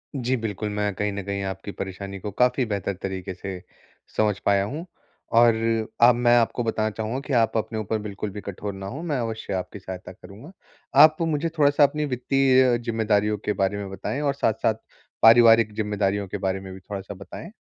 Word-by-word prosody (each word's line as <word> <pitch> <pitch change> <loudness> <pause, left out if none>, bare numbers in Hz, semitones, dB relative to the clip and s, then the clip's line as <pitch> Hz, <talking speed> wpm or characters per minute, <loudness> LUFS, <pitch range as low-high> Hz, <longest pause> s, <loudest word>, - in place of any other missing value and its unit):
जी। 130 -1 0
बिल्कुल, 105 -2 -4
मैं 105 0 -1
कहीं 105 +2 -1
न 100 0 -4
कहीं 100 0 -3
आपकी 95 +1 -5
परेशानी 100 0 -6
को 105 +2 -5
काफ़ी 125 +4 +2
बेहतर 100 -3 -2
तरीक़े 95 -1 -4
से 95 0 -7 0.6
समझ 105 -3 +2
पाया 100 -1 +3
हूँ। 145 - -5 0.5
और 120 0 +7 0.5
अब 120 +1 +7
मैं 120 0 +4
आपको 120 +1 +1
बताना 110 -1 0
चाहूँगा 110 +4 -4
कि 140 - -2
आप 115 -2 +2
अपने 110 0 -2
ऊपर 110 +1 -2
बिल्कुल 105 0 -5
भी 105 - -7
कठोर 100 +1 -6
ना 95 0 -8
हो 135 +10 -6
मैं 155 -5 -1
अवश्य 110 -3 -4
आपकी 95 +2 -4
सहायता 95 -1 -8
करूँगा। 100 - -13 0.5
आप 155 0 +6
मुझे 165 0 0
थोड़ा-सा 145 0 +4
अपनी 150 +1 +2
वित्तीय 130 -1 +3
ज़िम्मेदारियों 105 -2 +1
के 105 - +1
बारे 95 +1 0
में 100 -1 -5
बताएँ 130 +8 -4
और 140 -2 +1
साथ-साथ 110 -4 +1 0.5
पारिवारिक 115 -1 +7
ज़िम्मेदारियों 100 -2 -1
के 100 - -4
बारे 95 0 -1
में 95 -1 -9
भी 95 - -10
थोड़ा-सा 100 +1 -7
बताएँ? 100 - -10
105 Hz, 190 wpm, -24 LUFS, 100-120 Hz, 0.6 s, और